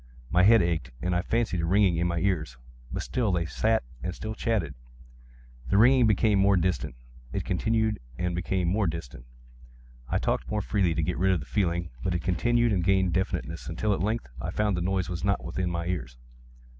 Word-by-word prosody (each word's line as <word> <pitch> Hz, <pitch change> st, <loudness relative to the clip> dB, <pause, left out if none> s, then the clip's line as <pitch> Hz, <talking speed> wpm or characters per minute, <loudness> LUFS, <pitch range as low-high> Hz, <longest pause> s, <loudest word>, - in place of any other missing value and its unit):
My 90 Hz, -, +4 dB
head 105 Hz, +1 st, +6 dB
ached, 80 Hz, -7 st, -1 dB
and 90 Hz, +3 st, -1 dB
I 90 Hz, -, +2 dB
fancied 110 Hz, -2 st, 0 dB
a -, -, -1 dB
ringing 95 Hz, -1 st, +3 dB
in 85 Hz, +1 st, +1 dB
my 85 Hz, 0 st, -2 dB
ears: 80 Hz, -9 st, -1 dB, 0.3 s
but -, -, -3 dB
still 115 Hz, -5 st, 0 dB
they 85 Hz, -2 st, 0 dB
sat 110 Hz, -, +1 dB, 0.2 s
and 90 Hz, +3 st, -4 dB
still 110 Hz, 0 st, -5 dB
chatted. 110 Hz, -, -1 dB, 1.0 s
The 100 Hz, -, +3 dB
ringing 125 Hz, +2 st, +6 dB
became 105 Hz, -1 st, +3 dB
more 100 Hz, 0 st, +4 dB
distinct:—it -, -, -4 dB
continued 110 Hz, -1 st, 0 dB, 0.2 s
and 90 Hz, 0 st, -1 dB
became 90 Hz, +1 st, -1 dB
more 100 Hz, +2 st, +1 dB
distinct: 75 Hz, -7 st, -6 dB, 0.8 s
I -, -, +1 dB
talked -, -, -1 dB
more 105 Hz, -1 st, -1 dB
freely 95 Hz, -6 st, +1 dB
to 80 Hz, -, 0 dB
get 90 Hz, +2 st, -2 dB
rid 95 Hz, +1 st, +3 dB
of 90 Hz, -, 0 dB
the 70 Hz, -, -8 dB
feeling: 85 Hz, +4 st, -1 dB
but 90 Hz, -, 0 dB
it 85 Hz, -, -2 dB
continued 120 Hz, +5 st, +2 dB
and 90 Hz, -3 st, +1 dB
gained 95 Hz, -1 st, +2 dB
definiteness—until, 85 Hz, -, -2 dB
at -, -, -2 dB
length, 110 Hz, +4 st, -1 dB, 0.2 s
I -, -, -3 dB
found 105 Hz, -2 st, 0 dB
that 90 Hz, -, -2 dB
the -, -, -2 dB
noise 95 Hz, -1 st, 0 dB
was 90 Hz, -2 st, -5 dB
not 100 Hz, 0 st, +1 dB
within 90 Hz, -1 st, -2 dB
my 85 Hz, -1 st, -3 dB
ears. 70 Hz, -10 st, -4 dB
90 Hz, 200 wpm, -27 LUFS, 85-105 Hz, 1.0 s, head